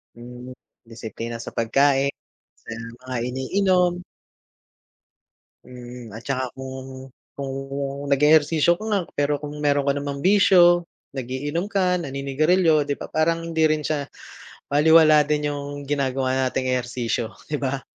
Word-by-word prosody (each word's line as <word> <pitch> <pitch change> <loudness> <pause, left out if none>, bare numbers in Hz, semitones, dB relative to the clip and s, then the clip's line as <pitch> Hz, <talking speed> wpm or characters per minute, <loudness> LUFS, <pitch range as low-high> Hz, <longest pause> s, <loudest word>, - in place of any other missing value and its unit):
Hmm, 125 +1 -10 0.3
disiplina 115 0 -7
sa - - -8
pagkain, 135 +4 +2 0.5
sa - - -12 0.3
mga 130 0 -6
iniinom. 180 +7 +1 1.7
Hmm, 125 -3 -10
at 110 - -8
'tsaka 130 -1 -3
kung, 130 0 -9 0.2
kung 135 -1 -5 0.6
nag-eehersisyo 155 +3 +4
ko 215 - -9
nga 205 -3 +1 0.2
pero 145 0 0
kung 150 0 -7
mayro'n 145 -1 +1
ka 140 - +3
namang 140 0 -4
bisyo, 175 -3 +5 0.3
nag-iinom 140 +8 -3
ka, 185 -3 +1
naninigarilyo 150 +4 +2
di 145 - -1
ba, - - -8
parang 165 +1 +1
hindi 160 -1 +2
rin 155 -1 +1
siya 145 -1 -2 0.6
balewala 155 +1 +6
din 150 0 0
yung 145 -1 -6
ginagawa 130 -2 0
nating 130 0 -1
ehersisyo 120 -1 -3 0.2
di 150 - -1
ba? 135 -1 -2
140 Hz, 125 wpm, -23 LUFS, 130-155 Hz, 1.7 s, balewala